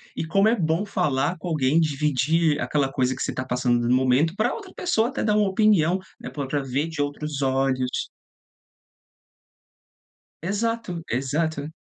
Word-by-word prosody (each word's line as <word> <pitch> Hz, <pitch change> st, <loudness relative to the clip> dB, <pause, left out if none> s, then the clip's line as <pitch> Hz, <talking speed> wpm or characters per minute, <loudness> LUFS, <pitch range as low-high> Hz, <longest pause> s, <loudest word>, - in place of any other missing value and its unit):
e -, -, -3 dB
como 195 Hz, +6 st, +3 dB
é 230 Hz, -, +4 dB
bom 165 Hz, +2 st, 0 dB
falar 160 Hz, -4 st, 0 dB
com 180 Hz, -, -7 dB
alguém, 155 Hz, -2 st, +2 dB
dividir 150 Hz, +1 st, +1 dB
aquela 140 Hz, -3 st, 0 dB
coisa 130 Hz, -1 st, 0 dB
que -, -, -8 dB
você -, -, -1 dB
tá 130 Hz, -, -4 dB
passando 125 Hz, -2 st, +1 dB
no 125 Hz, -, +3 dB
momento, 130 Hz, +6 st, +2 dB
pra 220 Hz, +3 st, +1 dB
outra 400 Hz, -5 st, -9 dB
pessoa 235 Hz, -10 st, +1 dB
até 270 Hz, -, -3 dB
dar 210 Hz, -1 st, +2 dB
uma 210 Hz, -2 st, +3 dB
opinião, 190 Hz, -4 st, +3 dB, 0.2 s
né, -, -, -7 dB
pra 140 Hz, -3 st, -5 dB
pra 145 Hz, +1 st, -1 dB
ver 135 Hz, +4 st, -1 dB
de 160 Hz, -3 st, -4 dB
outros 145 Hz, 0 st, -3 dB
olhos. 130 Hz, -1 st, 0 dB, 2.3 s
Exato, 205 Hz, -1 st, -2 dB
exato. 145 Hz, +4 st, -1 dB
155 Hz, 160 wpm, -24 LUFS, 135-185 Hz, 2.3 s, é